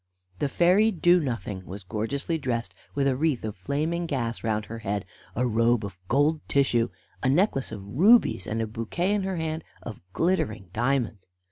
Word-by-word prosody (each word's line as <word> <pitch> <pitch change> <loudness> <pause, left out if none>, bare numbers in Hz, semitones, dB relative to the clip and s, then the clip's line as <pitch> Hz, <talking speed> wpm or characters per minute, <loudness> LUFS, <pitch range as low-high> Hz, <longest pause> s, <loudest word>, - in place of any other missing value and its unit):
The 145 - +1
fairy 185 +8 +4
Do 175 -3 +4
nothing 115 - -3
was 95 +3 -8
gorgeously 125 - -2
dressed 120 -4 -2 0.2
with 140 -1 +1
a 135 -2 +2
wreath 145 -2 0
of 110 -1 -4
flaming 155 - -1
gas 120 -6 -2
round 110 -2 0
her 115 +1 -7
head, 100 -2 -2 0.3
a 125 - +1
robe 115 -1 +2
of 100 -2 -9
gold 145 - +2
tissue, 120 -4 +2 0.3
a 130 - +2
necklace 145 -2 +2
of 100 -3 -7
rubies, 165 - +4
and 115 +1 -1
a - - 0
bouquet 115 - -1
in 210 - +1
her 190 0 -2
hand 160 0 -2 0.2
of 115 -4 -8
glittering 160 - 0
diamonds. 120 -4 0
130 Hz, 175 wpm, -26 LUFS, 110-160 Hz, 0.3 s, fairy